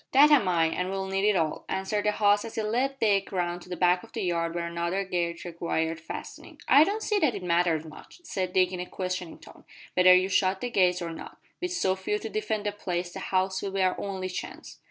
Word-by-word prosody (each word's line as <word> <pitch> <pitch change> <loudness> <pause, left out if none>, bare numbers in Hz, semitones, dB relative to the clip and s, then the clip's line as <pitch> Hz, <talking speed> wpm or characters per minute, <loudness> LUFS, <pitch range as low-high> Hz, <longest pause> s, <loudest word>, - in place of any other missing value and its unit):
"That 290 +3 +7
am 260 -10 +5
I, 170 -2 +3
and 180 +3 -1
we'll 195 0 -3
need 195 +2 +1
it 210 - +2
all," 160 -3 -1
answered 195 +2 -1
the 210 - +2
host 205 -1 +3
as 225 -1 -8
he 220 - -1
led 255 +6 0
Dick 200 -5 +1
round 175 -2 -2
to 180 - -14
the 180 - -4
back 180 0 +3
of - - -16
the - - -3
yard 170 -2 -1
where 170 -1 -2
another 170 +3 -2
gate 175 -2 -3
required 165 -1 -2
fastening. 165 - -9
"I 290 - +8
don't 420 +6 -2
see 420 -2 +1
that 305 -8 +2
it 185 - -6
matters 170 -2 +1
much," 155 - -13
said 185 - -3
Dick 185 0 +3
in 180 - -5
a 180 - -4
questioning 180 -2 -4
tone, - - -16 0.3
"whether 185 0 +7
you 185 +1 +3
shut 190 0 +1
the 245 - -3
gates 180 -4 +2
or 170 - -4
not. 165 - -9 0.2
With 360 0 -2
so 190 - +1
few 190 +2 -2
to 225 - -6
defend 215 0 -2
the 205 - 0
place 180 -3 -4
the 195 - -6
house 190 0 0
will 195 -1 -4
be 195 -1 +1
our 185 -1 +2
only 190 -2 -4
chance." 180 - -7
185 Hz, 245 wpm, -27 LUFS, 175-205 Hz, 0.3 s, I